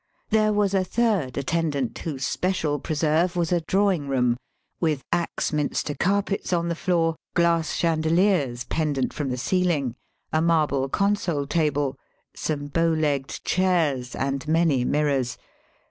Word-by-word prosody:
There 215 0 +3
was 205 -2 +1
a 190 -1 +3
third 190 - 0
attendant 140 -3 -1
whose 140 -5 -4
special 160 -6 -1
preserve 160 +4 +1
was 170 -1 0
a 175 -1 +2
drawing 185 -3 +1
room, 125 -3 +2 0.5
vnth 155 -5 +1
Axminster 150 -3 -1
carpets 200 +4 0
on 170 -1 +1
the 170 - -1
floor, 165 -2 +1 0.2
glass 170 -2 +2
chandeliers 160 -5 +1
pendant 145 -3 -1
from 145 -3 -3
the 125 - -2
ceiling, 155 -4 0 0.4
a 155 - +3
marble 150 -5 +2
consol 190 -6 0
table, 145 -4 0 0.4
some 145 -2 -3
bow 165 +3 +1
legged 150 -4 -1
chairs, 160 -9 +1
and 135 +2 -2
many 160 -5 +2
mirrors. 135 -3 0
160 Hz, 130 wpm, -24 LUFS, 140-175 Hz, 0.5 s, There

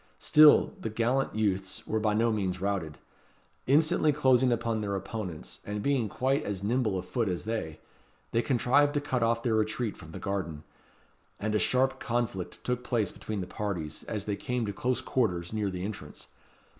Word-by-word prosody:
Still, 150 0 +6
the 110 - -3
gallant 120 +5 0
youths 95 -3 -1
were 110 - 0
by 105 -1 +1
no 115 +1 +3
means 95 -4 -1
routed. 95 -6 -2 0.7
Instantly 155 +2 +4
closing 130 -3 +4
upon 115 -2 0
their 100 -1 -2
opponents, 95 -4 -6
and 105 0 -4
being 135 -6 +1
quite 135 +5 +1
as 100 -2 -4
nimble 110 -2 +1
of 90 - -4
foot 115 -5 0
as 90 0 -3
they, 110 -9 -3 0.5
they 115 - +2
contrived 140 +4 +3
to - - +3
cut 130 -4 -1
off 115 0 +1
their 120 - +1
retreat 110 +1 0
from 80 -2 -12
the - - -7
garden; 95 -6 -3 0.8
and 105 +1 -1
a 105 - +3
sharp 130 +1 +2
conflict 115 -6 -3
took 125 0 -1
place 115 -6 0
between 105 -2 -5
the - - -3
parties, 90 -7 -4
as 105 -2 -4
they 105 - -1
came 125 +2 -2
to 100 - -3
close 125 +4 -1
quarters 95 -9 -1
near 105 -2 0
the 90 0 -4
entrance. 105 0 -7
110 Hz, 180 wpm, -29 LUFS, 100-125 Hz, 0.8 s, Still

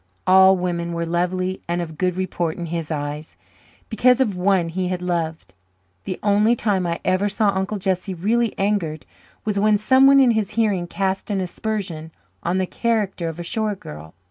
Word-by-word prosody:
All 190 +1 +6
women 170 -1 -2
were 170 0 -2
lovely 180 +2 -1
and 170 +1 -1
of 160 -2 -5
good 180 +2 0
report 175 -3 -2
in 175 - -4
his 165 -2 -3
eyes, 150 0 -4 0.5
because 250 +3 +3
of 220 -7 +1
one 180 -2 +1
he 180 +2 -2
had 180 0 -3
loved. 165 - -3 0.5
The 185 - -4
only 210 +3 +3
time 195 -6 0
I 170 0 -2
ever 190 +2 +2
saw 210 +1 +1
Uncle 195 +2 -1
Jesse 190 0 -2
really 225 +6 0
angered 195 -7 -1 0.4
was 210 -2 0
when 210 +1 +4
someone 265 +5 +5
in 260 -3 +5
his 215 -2 -1
hearing 205 -6 +1
cast 190 +3 -2
an 200 -2 0
aspersion 185 -4 -4 0.3
on 175 +2 -1
the 190 - +1
character 205 -5 -1
of 165 +1 -8
a - - -4
shore 215 +4 -1
girl. 80 - -11
185 Hz, 180 wpm, -22 LUFS, 170-210 Hz, 0.5 s, All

